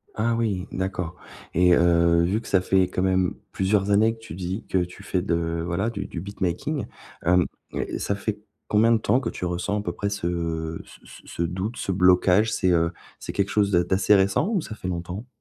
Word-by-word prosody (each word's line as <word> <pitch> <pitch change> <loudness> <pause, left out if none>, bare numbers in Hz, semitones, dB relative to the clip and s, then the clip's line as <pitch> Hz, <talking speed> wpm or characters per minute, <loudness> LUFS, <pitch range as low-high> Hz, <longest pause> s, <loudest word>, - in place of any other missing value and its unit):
Ah 115 +2 +1
oui, 100 -5 -1
d'accord. 90 -3 -3 0.4
Et, 90 +1 +5
heu, 85 0 +4
vu 100 +6 0
que - - -12
ça 95 -2 +3
fait 95 -1 +3
quand 90 - -2
même 95 -1 +1 0.2
plusieurs 100 +1 +1
années 110 +3 +4
que - - -20
tu 115 -8 -10
dis 95 +3 -4
que 95 - +1
tu 90 +3 -10
fais 95 -2 -1
de 85 -2 -1
voilà, 95 +6 -1
du 115 - -5
du 85 - -6
beat 100 +2 -10
making, 95 - -1 0.4
hem, 90 0 +4 0.3
ça - - -3
ça 100 - -1
fait 105 +1 -3 0.3
combien 110 +2 +4
de 115 - +5
temps 120 +3 +2
que 135 - -3
tu - - -5
ressens 90 +4 -1
à 105 - -5
peu 85 - -2
près 100 +2 -2
ce 85 -4 -3
ce - - -16
ce - - -13
ce - - -5
doute, 95 +7 -3
ce - - -2
blocage? 90 +3 +4
C'est, 95 -4 +1
heu, 85 -1 +2 0.3
c'est - - -6
quelque 100 0 0
chose 100 -1 +2
d'a 90 -1 +4
d'assez 95 +3 +3
récent 100 - +2
ou 200 -7 +1
ça 110 - -7
fait 90 - -6
longtemps? 90 +6 -5
95 Hz, 220 wpm, -24 LUFS, 85-105 Hz, 0.4 s, Et